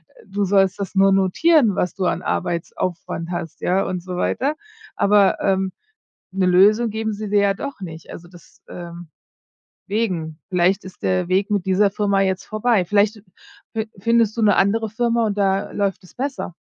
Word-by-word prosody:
Äh, -, -, -19 dB
du 200 Hz, +1 st, -2 dB
sollst 195 Hz, 0 st, +2 dB
das 195 Hz, -2 st, -4 dB
nur 195 Hz, 0 st, +5 dB
notieren, 215 Hz, -, +3 dB
was 180 Hz, -, -1 dB
du 190 Hz, -, -4 dB
an -, -, 0 dB
Arbeitsaufwand 170 Hz, -1 st, -3 dB
hast, 175 Hz, -2 st, -5 dB
ja, 190 Hz, +2 st, +1 dB
und 180 Hz, -1 st, -3 dB
so 180 Hz, -1 st, -6 dB
weiter. 280 Hz, +10 st, 0 dB, 0.4 s
Aber, 200 Hz, -1 st, +3 dB
ähm, 190 Hz, -1 st, +1 dB, 0.6 s
'ne 190 Hz, -1 st, +1 dB
Lösung 210 Hz, +6 st, +4 dB
geben 220 Hz, 0 st, -2 dB
sie 210 Hz, +1 st, -5 dB
dir 205 Hz, 0 st, +3 dB
ja 200 Hz, -1 st, +2 dB
doch 280 Hz, +3 st, -7 dB
nicht. 165 Hz, -4 st, -9 dB
Also, 175 Hz, -, -10 dB
des 175 Hz, -2 st, -19 dB
ähm, 175 Hz, -1 st, -9 dB, 0.8 s
wegen 180 Hz, -7 st, -2 dB
vielleicht 185 Hz, +1 st, +1 dB
ist 185 Hz, -, -12 dB
der 185 Hz, -1 st, 0 dB
Weg 190 Hz, +3 st, +1 dB
mit 200 Hz, -3 st, 0 dB
dieser 190 Hz, +2 st, +3 dB
Firma 200 Hz, -1 st, +1 dB
jetzt 190 Hz, -1 st, -1 dB
vorbei. 215 Hz, -3 st, +1 dB
Vielleicht 205 Hz, +3 st, +1 dB, 0.5 s
fin 220 Hz, -1 st, -3 dB
findest 230 Hz, 0 st, +2 dB
du -, -, 0 dB
'ne 210 Hz, -2 st, +4 dB
andere 220 Hz, +3 st, +1 dB
Firma 235 Hz, +1 st, 0 dB
und 205 Hz, -1 st, -2 dB
da 195 Hz, -1 st, 0 dB
läuft 200 Hz, -2 st, -2 dB
es -, -, -18 dB
besser. 265 Hz, -8 st, -4 dB
195 Hz, 180 wpm, -21 LUFS, 185-215 Hz, 0.8 s, nur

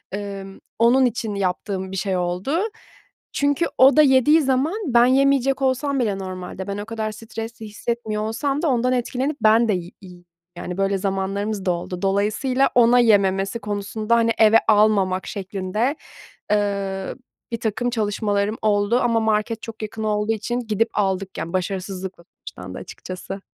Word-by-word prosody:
ımm, 195 Hz, -1 st, -7 dB, 0.2 s
onun 245 Hz, +3 st, +5 dB
için 225 Hz, -3 st, -2 dB
yaptığım 190 Hz, 0 st, -2 dB
bir 190 Hz, -, -4 dB
şey 190 Hz, 0 st, -1 dB
oldu. 180 Hz, -, -1 dB, 0.7 s
Çünkü 285 Hz, +3 st, +1 dB
o 270 Hz, +3 st, +6 dB
da -, -, +9 dB
yediği 285 Hz, +3 st, +5 dB
zaman 270 Hz, +4 st, +1 dB
ben 240 Hz, -1 st, +5 dB
yemeyecek 270 Hz, +1 st, +3 dB
olsam 265 Hz, +1 st, +1 dB
bile 205 Hz, -4 st, -1 dB
normalde, 185 Hz, 0 st, -6 dB
ben 200 Hz, 0 st, -3 dB
o 205 Hz, -, -5 dB
kadar 220 Hz, -1 st, -3 dB
stresli 225 Hz, +1 st, -8 dB
hissetmiyor 215 Hz, 0 st, -3 dB
olsam 275 Hz, +6 st, -1 dB
da 340 Hz, -, +1 dB
ondan 255 Hz, 0 st, +1 dB
etkilenip 260 Hz, +4 st, -1 dB
ben 220 Hz, +2 st, +5 dB
de 215 Hz, -, +2 dB
yi 180 Hz, -1 st, -4 dB
yi 180 Hz, -2 st, -14 dB, 0.3 s
yani, 180 Hz, +1 st, -5 dB
böyle 195 Hz, 0 st, +1 dB
zamanlarımız 195 Hz, +1 st, -2 dB
da 180 Hz, -, +2 dB
oldu. 175 Hz, +1 st, -4 dB
Dolayısıyla 215 Hz, +7 st, +1 dB
ona 245 Hz, 0 st, +6 dB
yememesi 195 Hz, -1 st, +2 dB
konusunda, 210 Hz, +2 st, -1 dB
hani, 230 Hz, 0 st, +3 dB
eve 220 Hz, 0 st, +6 dB
almamak 205 Hz, -3 st, +3 dB
şeklinde, 200 Hz, +6 st, -2 dB, 0.6 s
ııı, 200 Hz, -2 st, -1 dB, 0.4 s
birtakım 230 Hz, +1 st, -1 dB
çalışmalarım 210 Hz, -2 st, -1 dB
oldu 210 Hz, +3 st, +2 dB
ama 230 Hz, -1 st, +2 dB
market 220 Hz, 0 st, 0 dB
çok 225 Hz, -1 st, -9 dB
yakın 220 Hz, +1 st, -5 dB
olduğu 210 Hz, 0 st, 0 dB
için 240 Hz, +3 st, -3 dB
gidip 225 Hz, -2 st, 0 dB
aldık, 195 Hz, -2 st, -1 dB
yani, 170 Hz, -, -5 dB
başarısızlıkla 185 Hz, 0 st, -4 dB
sonuçlandı 90 Hz, 0 st, -9 dB
açıkçası. 185 Hz, +1 st, -8 dB
215 Hz, 150 wpm, -22 LUFS, 195-240 Hz, 0.7 s, da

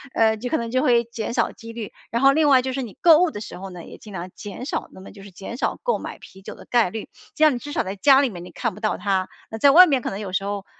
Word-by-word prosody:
呃， 220 Hz, -1 st, +3 dB
就 245 Hz, +3 st, -5 dB
可 315 Hz, -, +1 dB
能 230 Hz, -1 st, -4 dB
就 255 Hz, +1 st, +1 dB
会 235 Hz, -1 st, +3 dB
减 235 Hz, -1 st, -5 dB
少 -, -, +1 dB
几 230 Hz, 0 st, -11 dB
率。 225 Hz, -3 st, -6 dB, 0.2 s
然 235 Hz, +3 st, -1 dB
后 275 Hz, -, +7 dB
另 310 Hz, +1 st, +3 dB
外 260 Hz, -2 st, +6 dB
就 260 Hz, -, -2 dB
是 270 Hz, -, -2 dB
你 225 Hz, -6 st, -8 dB
购 330 Hz, -3 st, +7 dB
物 360 Hz, -1 st, +3 dB
的 210 Hz, -, -7 dB
时 -, -, -8 dB
候 195 Hz, +1 st, -7 dB
呢， 180 Hz, -2 st, -10 dB
也 -, -, -12 dB
尽 210 Hz, -, -12 dB
量 180 Hz, 0 st, -6 dB
减 205 Hz, +4 st, -8 dB
少 -, -, -4 dB
那 -, -, -14 dB
么 190 Hz, -, -12 dB
就 200 Hz, -, -14 dB
是 200 Hz, -, -11 dB
减 195 Hz, +6 st, -8 dB
少 -, -, -1 dB
购 485 Hz, -1 st, +1 dB
买 -, -, -7 dB
啤 190 Hz, -, -15 dB
酒 -, -, -9 dB
的 -, -, -14 dB
概 235 Hz, -6 st, +2 dB
率， 220 Hz, +3 st, -7 dB, 0.3 s
这 310 Hz, -, +1 dB
样 305 Hz, -, +6 dB
你 -, -, -4 dB
至 290 Hz, -, -8 dB
少 -, -, 0 dB
在 190 Hz, +1 st, -5 dB
家 270 Hz, +7 st, +5 dB
里 275 Hz, -, +1 dB
面 175 Hz, -5 st, -9 dB
你 -, -, -11 dB
看 235 Hz, -3 st, -3 dB
不 -, -, -12 dB
到 215 Hz, -1 st, -1 dB
它， 190 Hz, -2 st, -1 dB, 0.2 s
那 220 Hz, -, -5 dB
在 280 Hz, -, +6 dB
外 360 Hz, +6 st, +9 dB
面 270 Hz, -4 st, +1 dB
可 -, -, -3 dB
能 195 Hz, -, -6 dB
有 195 Hz, -3 st, -6 dB
时 195 Hz, -, 0 dB
候， 200 Hz, -1 st, -4 dB
230 Hz, 355 characters per minute, -22 LUFS, 200-265 Hz, 0.3 s, 外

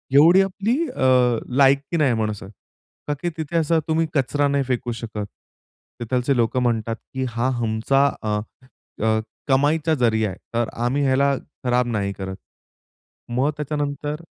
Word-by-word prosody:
एवढी 170 Hz, +7 st, +7 dB
आपली 200 Hz, +6 st, 0 dB
अ, 125 Hz, -2 st, +3 dB, 0.2 s
लायकी 140 Hz, +4 st, +3 dB
नाही 140 Hz, -5 st, +3 dB
माणसात 105 Hz, -3 st, -3 dB, 0.6 s
का 145 Hz, -, 0 dB
की 175 Hz, -, 0 dB
तिथे 160 Hz, +1 st, -2 dB
असं 165 Hz, 0 st, +2 dB
तुम्ही 160 Hz, +1 st, +2 dB
कचरा 145 Hz, +1 st, +1 dB
नाही 140 Hz, 0 st, +1 dB
फेकू 125 Hz, -2 st, -2 dB
शकत. 110 Hz, -3 st, -5 dB, 0.7 s
तिथलचे 125 Hz, +3 st, 0 dB
लोक 115 Hz, +2 st, +1 dB
म्हणतात 115 Hz, -2 st, 0 dB, 0.2 s
की 130 Hz, 0 st, -2 dB
हा 120 Hz, +2 st, -1 dB
आमचा 115 Hz, +5 st, +2 dB, 0.2 s
अ, 105 Hz, -1 st, 0 dB, 0.7 s
अ, 110 Hz, 0 st, +2 dB, 0.3 s
कमाईचा 150 Hz, +4 st, +2 dB
जरीया 110 Hz, -5 st, +2 dB
आहे, -, -, -9 dB, 0.2 s
तर 120 Hz, -1 st, +1 dB, 0.2 s
आम्ही 135 Hz, +4 st, +1 dB
ह्याला 140 Hz, +1 st, +3 dB, 0.3 s
खराब 125 Hz, 0 st, +2 dB
नाही 100 Hz, -4 st, -1 dB
करत. 95 Hz, -1 st, -6 dB, 1.0 s
मग 130 Hz, +5 st, +2 dB
त्याच्यानंतर 150 Hz, +1 st, -3 dB
130 Hz, 140 wpm, -22 LUFS, 115-145 Hz, 1.0 s, एवढी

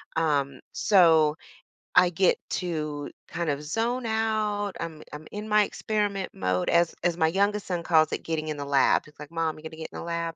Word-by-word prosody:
Um, 145 Hz, -4 st, 0 dB
so, 160 Hz, -5 st, +4 dB, 0.6 s
I 180 Hz, -, +7 dB
get 180 Hz, +2 st, +2 dB
to 155 Hz, -5 st, -3 dB, 0.2 s
kind 165 Hz, -1 st, -2 dB
of 145 Hz, +1 st, -2 dB
zone 230 Hz, +9 st, -1 dB
out. 215 Hz, -2 st, 0 dB
I'm 160 Hz, -2 st, -6 dB
I'm 150 Hz, +1 st, -8 dB
in 210 Hz, +1 st, -6 dB
my 210 Hz, 0 st, +4 dB
experiment 205 Hz, -2 st, -2 dB
mode 90 Hz, -1 st, -1 dB
as 170 Hz, 0 st, +3 dB
as 175 Hz, -1 st, +2 dB
my 160 Hz, -2 st, +2 dB
youngest 200 Hz, +3 st, 0 dB
son 175 Hz, -2 st, -2 dB
calls 160 Hz, -2 st, +4 dB
it -, -, -3 dB
getting 155 Hz, -1 st, -2 dB
in 150 Hz, -, -3 dB
the 145 Hz, -, -4 dB
lab. 140 Hz, -1 st, +3 dB
He's, 150 Hz, -, -17 dB
like, 150 Hz, +1 st, -10 dB
"Mom, 165 Hz, -1 st, -1 dB
you 155 Hz, -, -14 dB
gonna 160 Hz, 0 st, -8 dB
get 160 Hz, -, -6 dB
in -, -, -7 dB
the -, -, -6 dB
lab." 170 Hz, -1 st, -3 dB
165 Hz, 205 wpm, -26 LUFS, 155-200 Hz, 0.6 s, I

